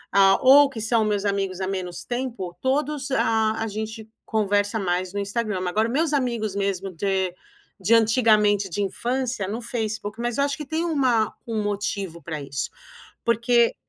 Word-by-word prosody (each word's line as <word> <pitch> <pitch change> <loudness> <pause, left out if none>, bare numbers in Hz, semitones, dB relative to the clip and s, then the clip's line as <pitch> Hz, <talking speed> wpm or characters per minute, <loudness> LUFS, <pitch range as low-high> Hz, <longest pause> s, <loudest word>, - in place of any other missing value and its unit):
hã, 195 -1 +6
ou 280 +2 +7
que 230 -5 -6
são 225 0 +2
meus 205 -1 0
amigos 195 -2 -1
há 190 - -1
menos 185 -2 -4
tempo, 240 -8 -4
todos, 280 +1 -1
ah, 220 -4 +2
a 225 - -2
gente 220 +1 -6 0.2
conversa 205 0 +1
mais 180 0 -1
no 205 - -2
Instagram, 205 -1 -2
mas 180 - -1
agora 215 +5 +1
meus 300 +4 +1
amigos 235 -7 -1
mesmo 195 -1 -1
de 190 +1 -1 0.4
de 200 +5 +2
antigamente 215 -3 +4
de 205 - -2
infância, 240 +1 -2
no 220 +5 -4
Facebook. 220 -2 -4
Mas 240 +1 -2
eu 280 - +4
acho 285 +1 -1
que 300 - -6
tem 320 +3 -2
uma 260 -9 +2 0.2
um 225 -2 -1
motivo 200 -4 -3
pra 155 -3 -5
isso, 140 -1 -4 0.5
porque 235 0 +3
215 Hz, 175 wpm, -24 LUFS, 195-240 Hz, 0.5 s, ou